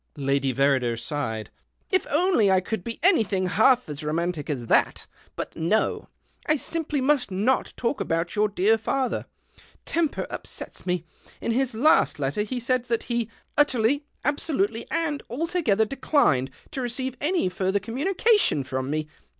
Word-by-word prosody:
Lady 140 -1 +1
Verrider 130 -3 +1
sighed. 115 -4 -4 0.2
" - - -40
If 375 - +2
only 305 - +3
I 190 -1 +5
could 185 +1 -4
be 230 +3 -5
mything 215 - +3
half 245 +7 +4
as 150 0 -6
romantic 160 0 -2
as 130 -5 -2
that! - - +2 0.3
But - - -5
no 170 +7 0
— - - -40
'. 305 - +1
simply 305 -1 -2
must 270 -3 +2
not 210 +8 +1
talk 255 +3 -1
about 165 +1 -1
your 210 0 +2
dear 210 +3 +2
father, 260 +3 -1 0.6
remper 325 -2 0
upsets - - -6
me. 180 -2 -1 0.3
In 235 - -2
his 250 0 0
last 245 - +4
letter 145 +7 -1
he 245 +4 -3
said 250 0 0
;hat 230 -2 0
he 235 -2 -2
' - - -43
Utterly, 280 0 +3 0.2
absolutely, 255 -6 0
and 305 -3 -1
altogether 265 - +1
leclined 210 - +2
' - - -28
to 265 - -4
receive 255 +1 -2
any 335 - +1
further 190 +2 0
communica 365 - +2
ion 140 - -1
from 130 0 -3
me. 155 +1 -2
220 Hz, 165 wpm, -25 LUFS, 165-270 Hz, 0.6 s, I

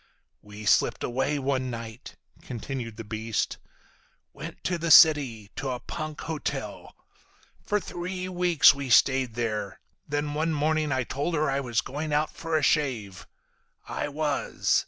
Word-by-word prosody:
"We 105 +1 -10
slipped - - +3
away 135 +4 0
one 130 -2 -1
night," 115 +1 -8 0.3
continued 120 -2 -6
the 115 - -6
beast. 110 +1 -2 0.7
"Went - - -9
to 175 -2 -1
the 170 0 -2
city. 135 -11 +6
To 140 -4 -3
a 125 -1 -3
punk 155 +2 -6
hotel. 160 -2 -5 0.7
For 210 - +1
three 185 0 -5
weeks 180 -5 +5
we 140 -1 -5
stayed 130 -1 +4
there. 105 -4 -3 0.3
Then 145 0 -2
one 160 +2 0
morning 155 0 +1
I 130 -1 +1
told 145 +7 -2
her 150 -2 +1
I 135 - 0
was 120 -4 0
going 150 +3 -5
out 150 +1 +1
for 165 -1 -2
a 155 - -1
shave. 120 - 0 0.6
I - - -3
was. 145 0 0
140 Hz, 150 wpm, -27 LUFS, 120-155 Hz, 0.7 s, city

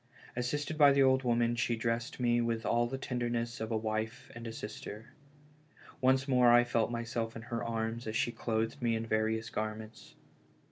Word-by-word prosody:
Assisted 145 +5 -2
by 145 -1 +8
the 140 0 +5
old 130 0 +4
woman 120 -1 +2
she 120 0 0
dressed 115 +2 -2
me 120 -1 +2
with 115 -1 -1
all 120 0 +2
the 135 +2 -4
tenderness 120 -2 -2
of 110 - -3
a 110 - +1
wife 110 0 -3
and 115 0 -7
a - - -4
sister. 110 0 -8 0.9
Once 130 +1 +3
more 125 -3 +5
I 120 0 +7
felt 115 -2 +1
myself 115 -1 -3
in 115 - -7
her 120 0 -4
arms 115 0 -3
as 110 - -3
she 120 - +1
clothed 115 0 -2
me 115 -1 +2
in 110 0 -2
various 110 +1 0
garments. 110 +1 -5
115 Hz, 185 wpm, -32 LUFS, 110-120 Hz, 0.9 s, by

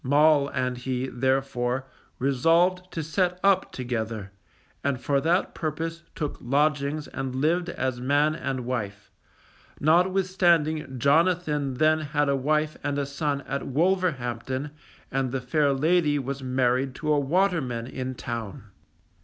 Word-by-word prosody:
Moll 145 +1 +4
and 125 -2 -2
he, 130 0 -2
therefore, 130 0 0 0.3
resolved 165 +8 +2
to 165 - -3
set 180 +3 0
up 195 -1 +3
together, 110 -5 -4 0.5
and 140 -2 0
for 140 +1 +1
that 170 +4 +1
purpose 165 +1 -3
took 150 -3 -3
lodgings 145 +3 0
and 130 -1 -4
lived 170 +6 +1
as 130 -6 -2
man 145 +4 +2
and 135 -3 -3
wife, 105 -5 -4 0.7
notwithstanding 170 -4 +2
Jonathan 150 0 +2
then 155 +3 +3
had 145 -1 0
a 140 - +3
wife 150 +3 0
and 145 -1 -1
a 140 - 0
son 140 0 -2
at 140 0 -4
Wolverhampton 140 -5 0 0.4
and 135 -1 0
the 135 - -1
fair 140 +3 +1
lady 150 +2 +2
was 140 0 -4
married 130 0 0
to 150 -1 0
a 145 - +3
waterman 145 -6 0
in 130 0 -5
town. 115 -6 -5
140 Hz, 135 wpm, -26 LUFS, 130-155 Hz, 0.7 s, Moll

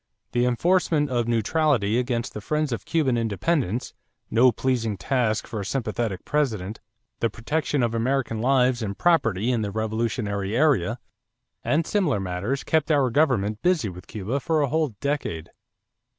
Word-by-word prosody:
The 120 0 +2
enforcement 155 +2 +2
of 120 -2 0
neutrality 120 -1 +2
against 120 -1 -2
the 105 - -6
friends 150 +5 -1
of 115 - -4
Cuban 145 -7 +1
independence, 115 - -1 0.4
no 125 +3 +5
pleasing 115 -5 -1
task 110 +3 0
for 110 - -5
a - - -3
sympathetic 110 -3 -2
President, 110 -9 -1 0.4
the 115 - +1
protection 130 +5 -1
of 115 -1 0
American 120 -1 0
lives 125 -1 +3
and 100 -3 -3
property 120 - +2
in 120 -3 0
the 105 - -2
revolutionary 110 -1 -2
area, 125 - +2 0.7
and 160 +2 +1
similar 170 - +1
matters 95 +8 -2
kept 160 -1 +1
our 140 -5 +3
government 115 -8 +1
busy 175 - +2
with 90 0 -11
Cuba 110 +6 -3
for 155 +2 +1
a 140 - 0
whole 155 -6 0
decade. 140 - -2
120 Hz, 150 wpm, -24 LUFS, 110-145 Hz, 0.7 s, no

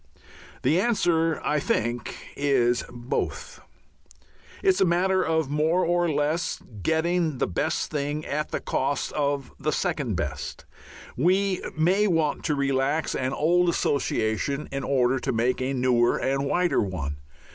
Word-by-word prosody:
The 165 - +3
answer, 165 -8 +1
I 150 - +1
think, 120 -3 -1 0.2
is 125 -4 +2
"Both." 120 +1 -4 1.0
It 390 - +4
is 375 - +3
a - - +6
matter 185 +2 +2
of 160 -4 0
more 160 +5 +2
or 175 0 +2
less, 150 +3 0
of 105 -5 -14
getting 160 - +1
the - - +1
best 90 - -1
thing 145 +1 -2
at 150 +1 -2
the - - -2
cost 135 0 -1
of 140 -2 -1
the - - -1
second - - -1
best. - - -4 0.5
We 185 +6 +2 0.2
may 185 +6 +3
want 165 -5 +1
to 150 - +1
relax 140 +2 0
an 130 0 -1
old 175 +5 +3
association 140 -3 0
in 135 0 -3
order 130 -1 +2
to 135 - -2
make 125 +2 0
a 130 +1 -1
newer 125 -2 +2
and 135 +1 0
wider 175 -1 +2
one. 80 -8 -3
145 Hz, 145 wpm, -25 LUFS, 130-170 Hz, 1.0 s, a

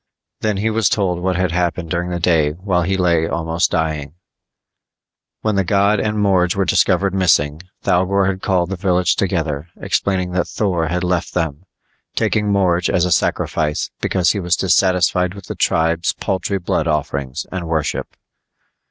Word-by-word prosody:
Then 105 -2 -1
he 110 +3 0
was 110 -4 +2
told 90 -4 0
what 90 +1 -1
had 90 -1 0
happened 85 -1 -1
during 90 0 -1
the 90 -1 -2
day 80 -4 +2
while 90 +1 -1
he 95 +3 0
lay 85 -3 +2
almost 85 0 0
dying: 75 -2 -2 1.3
When 110 - 0
the 95 - +3
god 100 +2 +2
and 105 0 -1
Morge 95 -4 +2
were 95 0 +1
discovered 100 +2 +2
missing, 80 -5 +2 0.2
Thougor 95 +2 +2
had 95 0 -2
called 90 -1 0
the - - -1
village 90 -1 +1
together, 80 -5 -1
explaining 90 -2 -1
that 90 -1 0
Thor 90 -6 -1
had 90 +3 -2
left 90 -1 -1
them, 80 -1 -2 0.5
taking 105 -1 +1
Morge 90 -3 +2
as 90 - +2
a 90 - -1
sacrifice 75 -1 0
because 90 -3 +2
he 100 - -2
was 90 -2 +1
dissatisfied 90 -1 +2
with 100 - -10
the - - -5
tribe's 80 +1 +1
paltry 100 0 -2
blood 85 -3 -1
offerings 70 -4 -2
and 90 -3 -4
worship. 80 -2 -2
90 Hz, 165 wpm, -19 LUFS, 85-95 Hz, 1.3 s, the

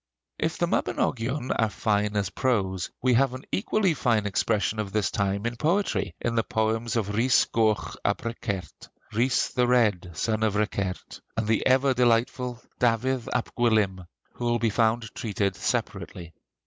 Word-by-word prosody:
If - - -1
the - - +2
'Mabinogion' 130 +3 -1
are 110 -2 +3
fine 105 0 0
as 100 -2 0
prose, 95 -6 0
we 130 -1 +4
have 130 +1 +3
an 130 - -8
equally 200 -2 +1
fine 115 -7 +1
expression 105 +1 0
of 105 -2 -3
this 105 -1 0
time 100 +1 -1
in 120 0 -2
poetry, 155 - 0
in 115 - -1
the 115 - +2
poems 110 +2 -1
of 105 -3 -1
Rhys 120 +4 +4
Goch 110 -2 0
ab - - 0
Rhicert 115 -5 -5 0.2
(Rhys 125 +4 +2
the 125 -1 +1
Red, 105 -8 +2
son 110 -1 0
of 110 -2 +1
Rhicert) 100 -3 -2 0.2
and 115 - 0
the 110 0 +2
ever 135 +1 +4
delightful 125 0 +1 0.2
Dafydd 125 +1 +1
ab 125 - -2
Gwilym, 105 -7 +1 0.3
who 120 - -5
will 120 0 +2
be 115 -2 +1
found 115 0 +1
treated 100 -3 -1
separately. 85 -2 -3
115 Hz, 160 wpm, -26 LUFS, 105-125 Hz, 0.3 s, we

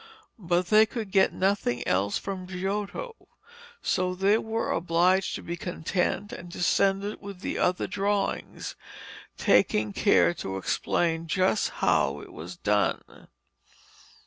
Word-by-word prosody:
But 175 -1 +1
they 215 +1 +6
could 215 -4 -5
get 190 -1 +4
nothing 190 -11 0
else 100 +2 +1
from 190 -2 -5
Giotto, 200 - -4 0.6
so 185 -1 0
they 200 +4 +3
were 225 0 -2
obliged 180 +3 +2
to - - -7
be 170 - -4
content 180 +3 -2
and 175 0 -9
to - - -3
send 195 +2 +3
it 205 +1 -5
with 200 -3 -9
the - - -3
other 180 0 +1
drawings, 200 0 -2 0.6
taking 105 -1 +3
care 85 - +4
to 95 +2 -5
explain 165 - 0
just 185 +5 +1 0.2
how 70 +2 +2
it - - -12
was 85 +3 -8
done. 105 0 -1
185 Hz, 135 wpm, -27 LUFS, 165-200 Hz, 0.6 s, they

